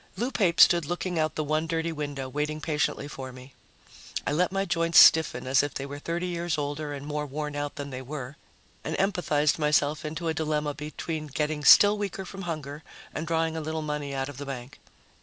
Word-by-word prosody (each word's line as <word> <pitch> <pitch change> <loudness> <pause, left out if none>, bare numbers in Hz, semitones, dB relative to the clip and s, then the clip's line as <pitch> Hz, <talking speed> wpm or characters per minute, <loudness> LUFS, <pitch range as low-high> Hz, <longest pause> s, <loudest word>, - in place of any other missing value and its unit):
Lou 240 +6 -1
Pape 185 -9 +1
stood 170 -3 +7
looking 175 0 -2
out 155 0 0
the 155 - -1
one 155 +2 0
dirty 165 +1 -1
window, 145 -3 -4
waiting 150 +3 -2
patiently 150 -2 -1
for 130 -3 -7
me. 130 +1 -13 0.7
I - - 0
let 180 +5 +1
my 195 0 0
joints 165 -1 +1
stiffen 160 -8 +7
as 130 +1 +4
if 145 0 -4
they 135 - -3
were 140 +1 -7
thirty 170 +4 -3
years 175 -2 -2
older 145 +1 -3
and 140 -1 -6
more 150 0 -3
worn 150 +1 -4
out 145 0 -3
than 140 -1 -6
they 130 0 -5
were, 135 0 -7 0.5
and - - -3
empathized 155 -6 +1
myself 150 0 +2
into 160 +2 -4
a 160 - +1
dilemma 150 -2 -1
between 155 +1 -5
getting 150 +1 -2
still 205 +8 +8
weaker 195 -1 -4
from 195 +1 -8
hunger 150 -2 -5 0.3
and 160 +2 -4
drawing 165 0 0
a 160 - -3
little 160 +1 -3
money 150 -2 -3
out 135 0 -2
of 145 -3 -9
the 145 - -6
bank. 135 0 -7
150 Hz, 210 wpm, -27 LUFS, 145-165 Hz, 0.7 s, still